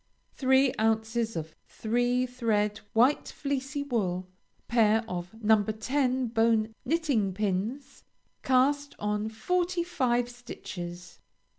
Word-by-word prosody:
Three 265 0 +3
ounces 225 +1 0
of 160 -1 -5
Three 245 +3 0
thread 220 -4 0
White 250 +6 +3
Fleecy 280 0 -3
Wool. 185 -9 -1 0.4
Pair 225 -1 +3
of 175 0 -5
No. 215 -1 +5
10 255 +4 0
Bone 225 -1 +2
Knitting 260 - 0
Pins. 210 +7 -3 0.4
Cast 280 +2 +2
on 210 +1 -1
forty 355 +9 0
five 245 -8 0
stitches. 175 -7 -8
230 Hz, 105 wpm, -28 LUFS, 210-265 Hz, 0.4 s, No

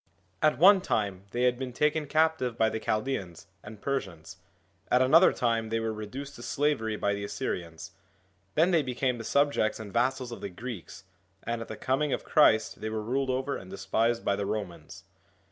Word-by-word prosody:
At 155 - +3
one 190 +4 +7
time 100 - -2
they 120 +4 -1
had 125 0 +2
been 130 -2 -5
taken 150 +3 +1
captive 155 -6 +1
by 110 -1 +3
the 110 - -3
Chaldeans 110 -7 -3 0.2
and 105 0 -11
Persians, 95 - -4 0.5
at 125 - +4
another 155 +8 +6
time 115 -2 0
they 115 +1 0
were 115 -1 -2
reduced 120 +7 -7
to - - -10
slavery 130 -5 0
by 100 -1 0
the 100 0 -4
Assyrians, 90 -6 -5 0.6
then 170 +4 +4
they 170 -3 +4
became 125 -2 -1
the - - -5
subjects 140 -4 +1
and 105 -3 -8
vassals 125 +1 0
of 120 - -8
the 100 - -4
Greeks, 105 0 -8 0.4
and 115 0 -3
at 115 - -6
the - - -7
coming 135 +2 0
of - - -2
Christ 110 -11 +3
they 110 - -3
were 110 0 -3
ruled 130 +4 -1
over 130 +2 -1
and 95 - -9
despised 110 +5 0
by 100 - +2
the 100 0 -3
Romans. 90 -7 -5
120 Hz, 190 wpm, -28 LUFS, 105-135 Hz, 0.6 s, one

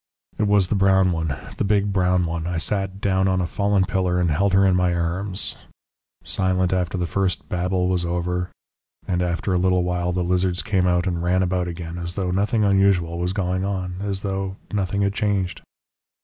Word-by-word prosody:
"It 105 - +2
was 100 -3 +3
the - - +1
brown 95 -1 +4
one, 80 -4 -2 0.2
the - - 0
big 100 0 +1
brown 90 -1 +2
one. 85 0 -3
I 90 -1 -2
sat 95 +2 -2
down 95 -1 +2
on 95 -1 +1
a 90 - 0
fallen 100 +1 +1
pillar 90 -2 0
and 85 -2 +1
held 95 +6 +2
her 95 +1 +5
in 95 -1 +4
my 90 -1 +2
arms.... 90 +3 -2 0.7
Silent 95 -1 0
after 90 0 -1
the 90 - -1
first 95 +1 -1
babble 90 0 0
was 90 -1 +1
over. 90 +1 -2 0.6
And 90 -1 0
after 90 +2 -1
a 90 - +2
little 90 0 +2
while 90 0 -1
the 90 0 -1
lizards 90 0 0
came 95 -4 +1
out 90 0 +2
and 85 -2 -1
ran 90 +2 +2
about 90 -1 0
again, 85 0 -6
as 85 0 -5
though 95 -2 -1
nothing 105 +4 +1
unusual 95 -4 +2
was 90 +1 -1
going 95 -1 -1
on, 95 -2 -3
as 100 -1 -3
though 95 -1 -3 0.2
nothing 100 0 0
had 100 0 +1
changed.... 100 -4 -1
90 Hz, 200 wpm, -23 LUFS, 90-95 Hz, 0.7 s, her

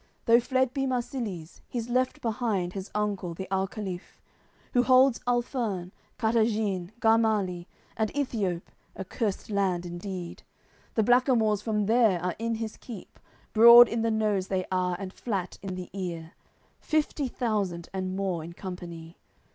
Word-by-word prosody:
Though 235 +1 +6
fled 260 +1 0
be 270 -1 -1
Marsilies, 235 - -4
He's 235 -2 -4
left 255 +1 0
behind 220 -6 -1
his 195 0 -6
uncle, 200 -5 -2
the 190 +2 -6
alcaliph 190 -1 -4 0.5
Who 245 - +5
holds 255 0 +5
Alferne, 235 -7 -1 0.3
Kartagene, 220 -5 +1
Garmalie, 215 -6 +2 0.3
And 220 -1 0
Ethiope, 210 -11 -1 0.3
a 190 - -6
cursed 210 +1 -3
land 190 -3 0
indeed; 175 0 -6 0.5
The 220 - +3
blackamoors 240 -3 +3
from 210 -1 0
there 220 -4 +4
are 180 0 -2
in 230 0 -1
his 220 -1 -5
keep, 225 -7 -10 0.3
Broad 235 +2 +10
in 230 - -2
the 230 - +1
nose 210 -4 0
they 185 -1 -1
are 180 -1 +1
and 190 -1 -6
flat 195 -6 -4
in 195 -2 -5
the 180 -1 -7
ear, 170 -4 -5 0.5
Fifty 305 -2 0
thousand 200 -9 -2
and 185 -1 -3
more 190 -4 -2
in 170 +2 -8
company. 170 -3 -8
210 Hz, 145 wpm, -28 LUFS, 185-235 Hz, 0.5 s, Broad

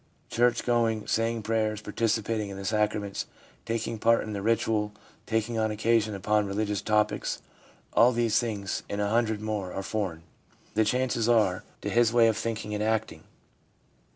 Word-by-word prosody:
Church 120 0 +2
going, 115 -3 +1
saying 115 0 0
prayers, 110 -1 0
participating 110 -1 -1
in 100 - -7
the 95 - -6
sacraments, 105 -1 -1 0.4
taking 115 0 -2
part 115 +1 +4
in 110 - -5
the 100 - -3
ritual, 110 -1 +1 0.3
talking 115 +1 0
on 110 0 +1
occasion 110 0 +1
upon 105 +2 +1
religious 105 0 -1
topics, 105 0 0 0.5
all 120 +2 +6
these 115 -2 +2
things 105 -5 -3
and 100 - -3
a 105 0 +1
hundred 110 -1 +1
more 105 -4 -3
are 95 - -4
foreign, 95 -6 -3 0.5
the 110 - +3
chances 120 0 +1
are, 105 -6 +3 0.2
to - - -3
his 120 -1 +4
way 120 -1 +5
of 110 - +2
thinking 110 -1 -3
and 105 - -2
acting. 110 0 -1
110 Hz, 160 wpm, -28 LUFS, 105-115 Hz, 0.5 s, all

